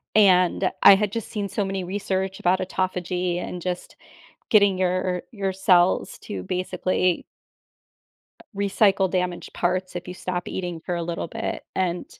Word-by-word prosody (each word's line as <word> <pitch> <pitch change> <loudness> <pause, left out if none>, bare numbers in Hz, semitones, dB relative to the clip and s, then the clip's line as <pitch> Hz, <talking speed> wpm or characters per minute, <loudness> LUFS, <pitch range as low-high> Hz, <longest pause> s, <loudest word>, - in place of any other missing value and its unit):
And, 185 -2 +4
I 195 - +10
had 205 0 0
just 230 -2 -4
seen 205 -2 -3
so 205 - -1
many 195 -1 -3
research 190 0 -2
about 185 +1 +3
autophagy, 180 -1 -1
and 180 0 -5
just 180 0 -4 0.5
getting 200 -3 +5
your 185 -1 0
your 195 -3 -2
cells 185 -1 +3
to 210 - -5
basically 185 -1 0 1.2
r - - -16 0.2
recycle 195 -1 +3
damaged 180 -1 -2
parts 185 +1 -1
if 175 +1 -5
you - - -5
stop 180 -1 -4
eating 175 -3 -4
for 180 - -3
a 170 - -2
little 170 0 -3
bit - - -4
and 180 -2 -1
185 Hz, 150 wpm, -24 LUFS, 180-195 Hz, 1.2 s, I